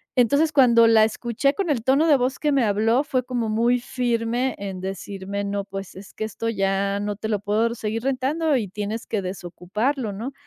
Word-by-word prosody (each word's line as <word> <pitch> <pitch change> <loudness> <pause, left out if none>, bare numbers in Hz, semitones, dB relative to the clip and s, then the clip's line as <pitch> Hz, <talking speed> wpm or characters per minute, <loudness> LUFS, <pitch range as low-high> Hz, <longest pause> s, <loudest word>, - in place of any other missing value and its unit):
Entonces, 285 +6 +3
cuando 240 -5 +6
la 220 -1 +6
escuché 240 +5 -1
con 390 -5 -2
el 255 -6 +1
tono 275 +5 +3
de 290 -3 +6
voz 255 +2 -1
que 300 -1 +1
me 270 -4 +3
habló, 225 +6 +2
fue 255 -4 0
como 245 -3 -2
muy 235 +3 +2
firme 240 0 -1
en 195 -2 -6
decirme: 195 +1 -5
"No, 200 0 -2
pues, 195 -1 -8
es 195 +1 -12
que - - -5
esto 225 +2 -4
ya 195 -1 0
no 205 0 -2
te 220 +2 -5
lo 210 -2 0
puedo 215 +3 0
seguir 225 +1 -3
rentando 275 +3 0
y 210 -4 -2
tienes 210 +3 -5
que 210 -3 -1
desocuparlo", 200 +7 -3
¿no? 235 +8 -6
225 Hz, 200 wpm, -23 LUFS, 200-255 Hz, -, cuando